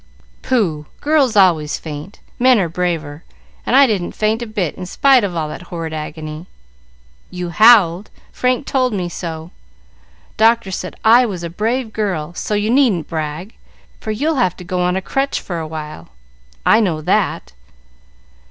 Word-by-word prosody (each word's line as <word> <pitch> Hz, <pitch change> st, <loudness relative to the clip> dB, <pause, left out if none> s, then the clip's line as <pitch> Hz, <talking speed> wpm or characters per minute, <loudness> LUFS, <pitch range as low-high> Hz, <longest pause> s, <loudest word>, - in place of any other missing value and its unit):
"Pooh! 175 Hz, -12 st, -1 dB
Girls 285 Hz, -6 st, +2 dB
always 170 Hz, -7 st, +3 dB
faint. 155 Hz, +4 st, -9 dB, 0.2 s
Men 255 Hz, 0 st, +5 dB
are 190 Hz, -5 st, +1 dB
braver, 165 Hz, -3 st, -3 dB, 0.4 s
and -, -, +2 dB
I 275 Hz, +1 st, +8 dB
didn't 205 Hz, -8 st, -2 dB
faint 220 Hz, +2 st, 0 dB
a 235 Hz, -, -4 dB
bit 205 Hz, -7 st, -2 dB
in 180 Hz, -, -8 dB
spite 265 Hz, +4 st, +4 dB
of 190 Hz, -3 st, -2 dB
all 160 Hz, -2 st, -1 dB
that 155 Hz, -, -7 dB
horrid 165 Hz, -2 st, -5 dB
agony." 155 Hz, +1 st, -7 dB, 0.8 s
"You 180 Hz, -1 st, -5 dB
howled; 210 Hz, -3 st, +5 dB, 0.2 s
Frank 255 Hz, +2 st, 0 dB
told 255 Hz, -3 st, 0 dB
me 180 Hz, -3 st, -2 dB
so. 165 Hz, -1 st, -6 dB, 0.9 s
Doctor 225 Hz, -2 st, +3 dB
said 185 Hz, 0 st, -5 dB
I 240 Hz, +3 st, +6 dB
was 185 Hz, -5 st, -5 dB
a 170 Hz, -, -5 dB
brave 225 Hz, +4 st, -2 dB
girl, 180 Hz, -7 st, -2 dB
so 210 Hz, -, -3 dB
you 205 Hz, +2 st, 0 dB
needn't 240 Hz, -, +2 dB
brag, 160 Hz, +5 st, -4 dB, 0.5 s
for 220 Hz, -, -8 dB
you'll 285 Hz, +8 st, 0 dB
have 180 Hz, -7 st, 0 dB
to -, -, -9 dB
go 180 Hz, +1 st, -3 dB
on 180 Hz, 0 st, +1 dB
a 190 Hz, -, -2 dB
crutch 270 Hz, +6 st, -1 dB
for 175 Hz, -3 st, -5 dB
a 160 Hz, -, -5 dB
while. 155 Hz, -, -8 dB, 0.6 s
I -, -, +5 dB
know 175 Hz, -8 st, 0 dB
that." 65 Hz, -, -1 dB
185 Hz, 165 wpm, -18 LUFS, 165-230 Hz, 0.9 s, I